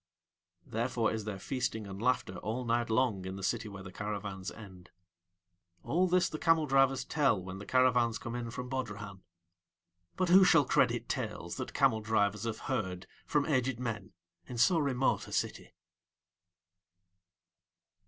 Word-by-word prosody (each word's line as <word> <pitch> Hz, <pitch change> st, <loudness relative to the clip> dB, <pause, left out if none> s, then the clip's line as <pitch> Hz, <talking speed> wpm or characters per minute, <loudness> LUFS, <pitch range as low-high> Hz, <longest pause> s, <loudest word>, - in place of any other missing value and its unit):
Therefore 115 Hz, 0 st, 0 dB
is 110 Hz, -2 st, -4 dB
there 105 Hz, -2 st, -4 dB
feasting 125 Hz, 0 st, -3 dB
and 100 Hz, 0 st, -7 dB
laughter 120 Hz, -6 st, 0 dB
all 120 Hz, +3 st, -3 dB
night 120 Hz, 0 st, +1 dB
long 110 Hz, -4 st, +1 dB
in 95 Hz, +1 st, -5 dB
the 95 Hz, -, -7 dB
city 110 Hz, +1 st, -1 dB
where 100 Hz, -1 st, -9 dB
the 95 Hz, -, -9 dB
caravans 100 Hz, -2 st, -4 dB
end. 95 Hz, -5 st, -12 dB, 0.9 s
All 180 Hz, +5 st, +2 dB
this 180 Hz, 0 st, +3 dB
the 155 Hz, -, -6 dB
camel 165 Hz, -1 st, +3 dB
drivers 135 Hz, -1 st, +3 dB
tell 140 Hz, -10 st, +2 dB
when 95 Hz, +1 st, -7 dB
the 100 Hz, -, -9 dB
caravans 125 Hz, -3 st, +3 dB
come 115 Hz, -, -6 dB
in 120 Hz, -1 st, -4 dB
from 125 Hz, +2 st, -6 dB
Bodrahan; 105 Hz, -7 st, -5 dB, 0.9 s
but 185 Hz, -1 st, 0 dB
who 190 Hz, +2 st, +8 dB
shall 165 Hz, -5 st, +5 dB
credit -, -, +2 dB
tales -, -, -4 dB
that -, -, -6 dB
camel 110 Hz, -, +3 dB
drivers 105 Hz, -1 st, +1 dB
have 115 Hz, -1 st, -3 dB
heard 95 Hz, -8 st, -3 dB, 0.2 s
from 145 Hz, -1 st, +2 dB
aged 130 Hz, -4 st, 0 dB
men 115 Hz, -6 st, -4 dB, 0.3 s
in 125 Hz, -, -6 dB
so 165 Hz, +8 st, +4 dB
remote 135 Hz, -3 st, +1 dB
a -, -, -11 dB
city? -, -, -3 dB
115 Hz, 155 wpm, -32 LUFS, 100-130 Hz, 0.9 s, who